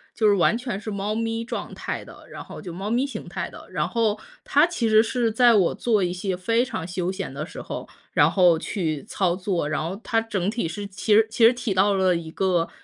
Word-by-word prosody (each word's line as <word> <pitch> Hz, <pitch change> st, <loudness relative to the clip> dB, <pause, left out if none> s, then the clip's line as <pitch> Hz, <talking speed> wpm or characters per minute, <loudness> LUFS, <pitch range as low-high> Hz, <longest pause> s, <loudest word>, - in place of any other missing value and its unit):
就 220 Hz, -, +3 dB
是 205 Hz, -, +6 dB
完 200 Hz, +4 st, +3 dB
全 240 Hz, -5 st, -4 dB
是 215 Hz, 0 st, -6 dB
猫 200 Hz, +2 st, -2 dB
咪 225 Hz, 0 st, -2 dB
状 230 Hz, -, -5 dB
态 -, -, -5 dB
的， -, -, -14 dB
然 -, -, -8 dB
后 -, -, -10 dB
就 180 Hz, -, -7 dB
猫 195 Hz, +4 st, -4 dB
咪 245 Hz, +4 st, +1 dB
形 225 Hz, -9 st, -7 dB
态 175 Hz, -, -4 dB
的。 -, -, -12 dB
然 150 Hz, -5 st, -1 dB
后 220 Hz, -3 st, 0 dB, 0.2 s
它 295 Hz, +4 st, +4 dB
其 245 Hz, -10 st, -1 dB
实 215 Hz, 0 st, +7 dB
是 230 Hz, 0 st, 0 dB
在 240 Hz, +1 st, +5 dB
我 195 Hz, -5 st, +3 dB
做 215 Hz, -5 st, +1 dB
一 175 Hz, -, 0 dB
些 185 Hz, 0 st, -2 dB
非 230 Hz, +6 st, +1 dB
常 175 Hz, -10 st, -5 dB
休 180 Hz, +1 st, -2 dB
闲 190 Hz, -7 st, -5 dB
的 145 Hz, +3 st, -4 dB
时 -, -, -9 dB
候， -, -, -6 dB, 0.2 s
然 -, -, +4 dB
后 180 Hz, -4 st, +4 dB
去 160 Hz, -7 st, -3 dB
操 185 Hz, -4 st, 0 dB
作， 185 Hz, -5 st, -1 dB
然 155 Hz, 0 st, -1 dB
后 185 Hz, +6 st, -4 dB
它 225 Hz, -1 st, +1 dB
整 205 Hz, -4 st, -2 dB
体 220 Hz, -6 st, -2 dB
是 200 Hz, +5 st, -5 dB
其 200 Hz, +2 st, +1 dB
实 220 Hz, +1 st, +6 dB
其 230 Hz, 0 st, +4 dB
实 235 Hz, -, +7 dB
起 245 Hz, -5 st, -2 dB
到 200 Hz, +2 st, +3 dB
了 185 Hz, -2 st, +3 dB
一 165 Hz, -1 st, -5 dB
个 180 Hz, -3 st, +1 dB
205 Hz, 260 characters per minute, -24 LUFS, 180-225 Hz, 0.2 s, 实